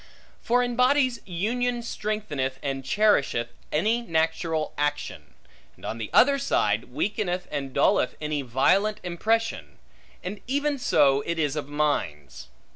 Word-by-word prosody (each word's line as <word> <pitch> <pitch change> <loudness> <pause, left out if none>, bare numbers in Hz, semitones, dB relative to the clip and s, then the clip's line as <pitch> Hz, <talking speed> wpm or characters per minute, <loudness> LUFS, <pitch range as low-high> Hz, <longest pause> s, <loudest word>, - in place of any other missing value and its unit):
For 245 +1 +2
in 245 -1 -2
bodies, 255 0 +3
union 240 +7 -1
strengtheneth 200 - -3
and 135 -1 -3
cherisheth 135 - +2 0.2
any 220 +10 +1
natural 160 -4 -1
action; 145 0 -3 0.4
and - - -13
on 115 - -4
the 110 - -4
other 275 +2 +5
side, 275 - +1
weakeneth 185 -4 -2
and 140 -2 -3
dulleth 125 - +2
any 150 -1 -2
violent 190 - +2
impression: 180 - -1 0.5
and 200 +3 -6
even 285 +2 0
so 140 - +3
it 170 0 -1
is 150 -3 0
of 145 -2 -4
minds. 145 - -2
170 Hz, 130 wpm, -26 LUFS, 145-230 Hz, 0.5 s, other